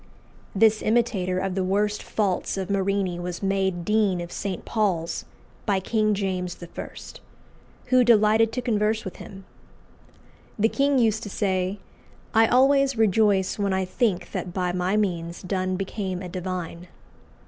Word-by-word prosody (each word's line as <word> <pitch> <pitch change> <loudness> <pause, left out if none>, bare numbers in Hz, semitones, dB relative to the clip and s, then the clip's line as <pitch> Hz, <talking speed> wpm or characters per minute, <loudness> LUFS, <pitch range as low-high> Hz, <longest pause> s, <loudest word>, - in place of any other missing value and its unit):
This 215 +1 +4
imitator 215 -5 +1
of 190 0 -1
the 190 0 -1
worst 205 +3 0
faults 195 -3 -1
of 190 0 -3
Marini 195 -2 0
was 175 +1 -5
made 190 -3 0
Dean 210 -4 +2
of 175 0 -6
St. 195 -3 -4
Paul's 185 -7 -1 0.4
by 200 -2 +2
King 215 +2 +1
James 185 -3 -2
I., - - -7 1.2
who 255 0 +5
delighted 220 -1 +4
to 250 - -3
converse 215 -2 0
with 190 - -7
him. 195 -1 -11 1.1
The 220 +1 +3
king 280 +2 +2
used 220 -3 +2
to 210 - -6
say, 190 -1 -1 0.6
"I 225 0 +5
always 270 +1 +4
rejoice 205 -2 +2
when 200 -1 +1
I 190 0 0
think 195 -1 -1
that 180 -2 -5
by 180 -2 0
my 180 +3 0
means 170 -5 -2
Donne 185 0 -1
became 190 -1 -4
a 180 - -6
divine." 180 -1 -5
195 Hz, 150 wpm, -25 LUFS, 185-215 Hz, 1.2 s, who